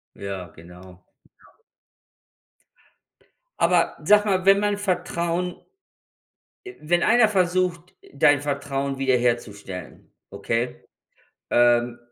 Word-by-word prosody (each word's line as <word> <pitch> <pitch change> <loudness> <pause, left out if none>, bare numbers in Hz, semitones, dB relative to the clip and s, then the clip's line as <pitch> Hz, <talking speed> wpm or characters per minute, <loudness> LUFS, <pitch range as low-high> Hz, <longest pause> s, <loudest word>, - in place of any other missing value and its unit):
Ja, 95 -3 -7
genau. 90 +2 -15 2.5
Aber - - +2
sag 210 0 +5
mal, 190 -3 0
wenn 195 0 +6
man 205 0 0
Vertrauen 180 -2 -2 1.2
wenn 175 +3 0
einer 230 0 +4
versucht, 180 -2 -1 0.2
dein 145 -1 +3
Vertrauen 140 -1 -3
wiederherzustellen, 120 -8 -2 0.2
okay? 120 +2 -3 0.7
Ähm 120 0 +2
140 Hz, 80 wpm, -23 LUFS, 120-180 Hz, 2.5 s, wenn